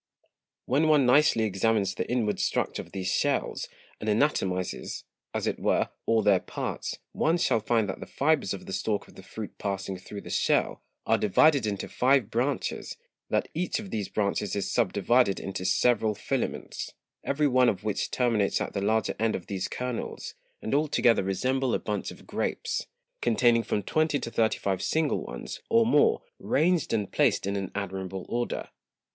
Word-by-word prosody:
When 145 +5 +2
one 150 -4 +5
nicely 125 -3 +5
examines 100 -1 +1
the - - -4
inward 115 -4 0
Structure - - 0
of - - -14
these 95 -1 -2
Shells, - - 0 0.3
and 110 - -3
anatomizes, 95 -7 0 0.3
as - - -2
it - - -1
were, - - +1 0.2
all 115 -1 +3
their 100 -3 +5
Parts; - - -4
one 165 +2 +2
shall 130 -9 +2
find 110 0 +1
that 95 - -4
the - - -8
Fibres 145 -7 +1
of 100 - -5
the 95 - -6
Stalk 105 0 -1
of - - -17
the - - -12
Fruit 105 +2 -8
passing 95 -1 -3
through 100 +2 -8
the - - -9
Shell, - - +1 0.2
are - - +3
divided 130 +4 +4
into 100 -2 -3
five 130 -3 +2
Branches; 130 +3 -2 0.3
that - - +1
each 175 +2 -1
of 205 -3 -8
these 105 -3 -2
Branches 105 -1 -1
is 100 -2 -2
subdivided 105 +1 +2
into 95 -1 -5
several 110 -2 +2
Filaments, - - -3 0.3
every 145 +2 +1
one 130 -2 +4
of 95 0 -3
which 105 -2 -1
terminates 115 -5 +1
at - - -3
the 100 - -2
larger 110 0 +1
End 110 0 +1
of 90 - -5
these 95 -2 -3
Kernels, 125 -2 -4 0.3
and 110 - -2
all 150 +2 +3
together 120 -5 +3
resemble 130 +7 0
a - - 0
Bunch 105 -1 -3
of - - -12
Grapes, 465 -1 -2 0.3
containing 120 - +4
from 105 -2 -2
twenty 155 +6 +1
to 115 - -5
thirty 110 -1 +2
five 95 -2 -1
single 160 -2 +1
ones, - - -7
or 230 0 +5
more, 450 - +4 0.2
ranged 170 -2 +1
and 105 -4 -1
placed - - +2
in 100 +1 -1
an 95 -2 -3
admirable 95 -2 -4
Order. 120 0 -2
110 Hz, 175 wpm, -28 LUFS, 100-135 Hz, 0.3 s, one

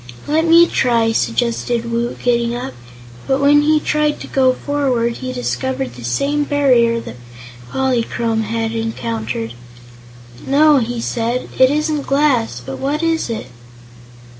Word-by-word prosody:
"Let 315 +2 +1
me 335 +1 +7
try," 230 -7 +1
suggested 235 0 -1
Woot, 235 +1 -2
getting 235 -1 +1
up; 240 - -5 0.5
but 265 0 +1
when 290 +1 +5
he 305 +1 +3
tried 300 0 0
to - - -7
go 260 -1 +2
forward, 255 -5 -1
he 255 -1 -5
discovered 260 +1 -3
the 120 - -11
same 280 - 0
barrier 255 -5 +2
that 125 - -9 0.5
Polychrome 235 -3 0
had 225 +1 -2
encountered. 115 - -4 0.9
"No," 295 +2 +5
he 240 0 -3
said, 235 +2 -2
"it 260 0 +6
isn't 300 0 -1
glass. 260 - +1
But 135 - -6
what 290 +4 -2
is 325 -5 0
it?" 225 - -4
250 Hz, 140 wpm, -18 LUFS, 230-285 Hz, 0.9 s, me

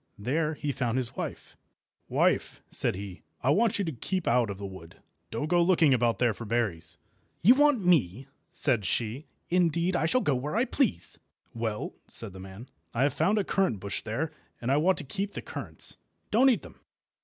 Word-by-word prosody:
There 150 +9 0
he 145 -1 -2
found 125 -2 -1
his 125 -2 -2
wife. - - -6 0.5
"Wife," - - +1
said - - +2
he, 95 -1 -7 0.2
"I 135 - +4
want 225 +7 +3
you 200 - 0
to 165 - -2
keep 180 +8 -3
out 120 -2 +3
of 100 - -5
the 100 - -6
wood. 95 -4 -10 0.3
Don't 115 +6 -2
go 175 +2 +3
looking 170 -5 +4
about 120 -2 +2
there 120 -3 +2
for 115 - -8
berries." 105 -8 -1 0.5
"You 225 +8 +9
want 285 -7 +3
me!" 135 - +2 0.2
said 120 -7 +2
she. 115 - -2 0.2
"Indeed, 175 0 +2
I 160 - +2
shall 255 +10 +2
go 145 - +2
where 135 +7 -2
I 235 +3 +3
please." 255 - -1 0.3
"Well," 110 -2 -3
said 110 -5 -1
the 95 - -10
man, 95 +6 -10 0.3
"I 120 - +2
have 145 - +2
found 195 +7 +2
a 205 - +2
currant 190 - +1
bush 100 -2 -2
there, 135 +9 -3 0.3
and 120 +2 -1
I 140 - +4
want 180 +5 +3
to - - -2
keep 195 +9 -4
the - - -5
currants. - - -4 0.3
Don't 255 +5 +6
eat 245 - +1
them." - - -13
135 Hz, 200 wpm, -28 LUFS, 110-180 Hz, 0.5 s, You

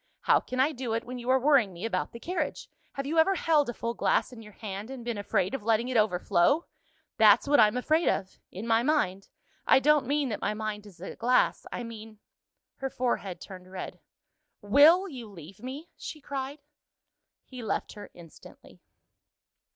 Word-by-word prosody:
How - - +4
can 255 - -6
I 275 +4 +4
do 250 -5 -4
it 230 - -2
when 250 0 -7
you 240 +1 -6
are 260 - +5
worrying 260 -8 +3
me 175 +5 -6
about 225 - -2
the 235 - -10
carriage? 330 -1 -3 0.3
Have 275 -1 -4
you 320 +3 +1
ever 385 +4 +4
held 310 -6 +2
a - - -3
full 230 0 -3
glass 245 - 0
in 230 - -10
your 210 -1 -13
hand, 205 +1 -7
and 260 -3 -8
been 235 -3 -3
afraid 195 0 0
of 270 - -3
letting 225 +3 +1
it 255 - -3
overflow? 210 - +2 0.5
That's - - +6
what 290 0 +4
I'm 215 +2 +5
afraid 310 +6 +1
of 190 -1 -3
in 195 +5 -7
my 230 0 +3
mind 195 -9 0 0.4
I - - +7
don't 295 -1 +3
mean 285 -1 0
that 210 - -4
my 210 - -1
mind 210 -1 -5
is 185 -4 -16
a 190 - -7
glass 250 +2 +1
I 245 - -4
mean 220 -2 -10 0.3
" - - -60
Her 270 - -2
forehead 240 -8 -2
turned 185 -1 -11
red. 190 - -7 0.6
"Will 300 - +5
you 250 - -9
leave 180 0 -12
me?" 275 +7 -8
she 310 - -8
cried. 280 0 -6 0.8
He 255 -2 -10
left 220 - -3
her 205 - -10
instantly. 170 -2 -15
240 Hz, 195 wpm, -28 LUFS, 210-280 Hz, 0.8 s, I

